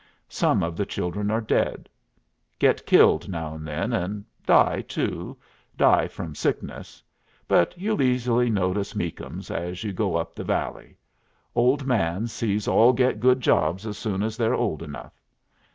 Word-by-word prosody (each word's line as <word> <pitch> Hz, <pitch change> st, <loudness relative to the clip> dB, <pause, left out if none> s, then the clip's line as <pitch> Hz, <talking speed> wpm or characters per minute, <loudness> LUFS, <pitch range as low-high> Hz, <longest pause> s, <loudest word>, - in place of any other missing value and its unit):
Some -, -, +1 dB
of 85 Hz, 0 st, -3 dB
the 100 Hz, -, -1 dB
children 100 Hz, +4 st, -3 dB
are 110 Hz, +1 st, +1 dB
dead. 110 Hz, -, -1 dB, 0.7 s
Get -, -, +2 dB
killed -, -, +5 dB
now 80 Hz, -4 st, -4 dB
and 80 Hz, 0 st, -8 dB
then, 80 Hz, +11 st, -2 dB
and 100 Hz, 0 st, -2 dB, 0.2 s
die -, -, +4 dB
too -, -, -4 dB, 0.4 s
die -, -, +4 dB
from 80 Hz, -3 st, -7 dB
sickness. -, -, -4 dB, 0.4 s
But 85 Hz, -, +2 dB
you'll 210 Hz, +3 st, -1 dB
easily 125 Hz, -2 st, +2 dB
notice 100 Hz, -1 st, -1 dB
Meakums -, -, -5 dB
as 90 Hz, +3 st, -4 dB
you 105 Hz, -3 st, -3 dB
go 95 Hz, -2 st, -1 dB
up 85 Hz, 0 st, -2 dB
the -, -, -7 dB
valley. -, -, -3 dB, 0.6 s
Old 130 Hz, +3 st, +2 dB
man 100 Hz, -5 st, 0 dB
sees 105 Hz, -3 st, -2 dB
all 120 Hz, +3 st, +5 dB
get 125 Hz, -2 st, +1 dB
good 130 Hz, +2 st, +3 dB
jobs 90 Hz, -2 st, +1 dB
as 105 Hz, -2 st, -4 dB
soon 100 Hz, -2 st, -2 dB
as 110 Hz, +1 st, -3 dB
they're 115 Hz, +1 st, +1 dB
old 80 Hz, -, -1 dB
enough. 75 Hz, -3 st, -10 dB
105 Hz, 155 wpm, -25 LUFS, 85-120 Hz, 0.7 s, killed